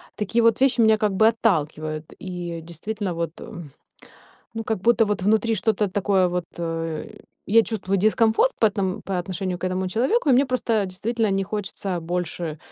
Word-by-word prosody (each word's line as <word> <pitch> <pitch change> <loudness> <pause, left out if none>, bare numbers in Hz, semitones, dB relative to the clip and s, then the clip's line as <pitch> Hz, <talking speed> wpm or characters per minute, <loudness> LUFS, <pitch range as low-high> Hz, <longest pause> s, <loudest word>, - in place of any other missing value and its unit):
Такие 220 +3 0
вот 230 +1 +3
вещи 265 -2 +3
меня 220 -1 +5
как 210 -1 +1
бы 220 +3 +4
отталкивают, 155 -8 0
и, 175 -2 -5
действительно, 185 +4 -5
вот, 165 -1 -3
м 160 -5 -9 0.8
Ну 225 0 -4
как 220 0 -1
будто 230 +1 +4
вот 210 -1 -1
внутри 220 +3 +2
что-то 210 0 0
такое 190 -1 +2
вот, 180 -1 -2
э, 165 -1 -3 0.4
я 225 +3 +6
чувствую 195 -4 -2
дискомфорт 220 - +3
по 220 - +6
эт 210 0 -7 0.3
по 195 -2 -2
отношению 180 0 -3
к 185 - -1
этому 185 0 -2
человеку, 265 - +1
и - - +6
мне 265 +3 +4
просто 235 -5 0
действительно 220 +4 -1
не 195 0 +1
хочется 195 -2 -3
больше 170 -1 -3
195 Hz, 175 wpm, -23 LUFS, 175-225 Hz, 0.8 s, я